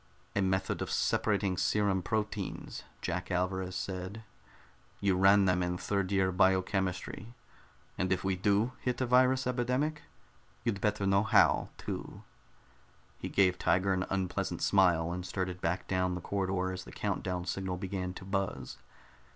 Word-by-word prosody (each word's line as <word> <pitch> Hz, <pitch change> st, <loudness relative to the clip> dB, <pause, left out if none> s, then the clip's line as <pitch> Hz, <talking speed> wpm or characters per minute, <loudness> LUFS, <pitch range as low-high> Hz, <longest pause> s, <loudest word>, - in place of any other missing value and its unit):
"A 100 Hz, -, +2 dB
method 95 Hz, 0 st, 0 dB
of -, -, -2 dB
separating 100 Hz, -3 st, +1 dB
serum 100 Hz, -1 st, +2 dB
proteins," 105 Hz, 0 st, -3 dB, 0.2 s
Jack 90 Hz, +1 st, -2 dB
Alvarez 95 Hz, 0 st, -1 dB
said. 95 Hz, +4 st, -5 dB, 0.8 s
"You 100 Hz, -2 st, +2 dB
ran 95 Hz, +2 st, +6 dB
them 90 Hz, -1 st, +2 dB
in 90 Hz, 0 st, -1 dB
third 100 Hz, 0 st, -1 dB
year 95 Hz, -1 st, +2 dB
biochemistry. 95 Hz, +3 st, 0 dB, 0.6 s
And 95 Hz, 0 st, 0 dB
if 95 Hz, -, +1 dB
we 95 Hz, -1 st, +1 dB
do 100 Hz, +5 st, +2 dB
hit 125 Hz, -1 st, -2 dB
a 130 Hz, -, +1 dB
virus 130 Hz, +2 st, +4 dB
epidemic, 125 Hz, +5 st, 0 dB, 0.6 s
you'd 110 Hz, -5 st, -1 dB
better 105 Hz, -2 st, 0 dB
know 100 Hz, 0 st, +4 dB
how, 110 Hz, 0 st, +4 dB
too." -, -, -6 dB, 1.0 s
He -, -, -4 dB
gave 90 Hz, -2 st, +3 dB
Tiger 95 Hz, +1 st, +2 dB
an 95 Hz, 0 st, -1 dB
unpleasant 95 Hz, -2 st, -2 dB
smile, 85 Hz, -4 st, +3 dB
and 90 Hz, 0 st, -4 dB
started 90 Hz, -1 st, -3 dB
back 85 Hz, +3 st, -1 dB
down 90 Hz, -1 st, 0 dB
the 90 Hz, -, -5 dB
corridor 95 Hz, -1 st, -1 dB
as 90 Hz, 0 st, -6 dB
the -, -, -12 dB
count -, -, -2 dB
down 90 Hz, -1 st, -3 dB
signal 95 Hz, -1 st, -2 dB
began 90 Hz, -1 st, -4 dB
to 95 Hz, -, -9 dB
buzz. 95 Hz, -10 st, -3 dB
95 Hz, 150 wpm, -31 LUFS, 90-100 Hz, 1.0 s, ran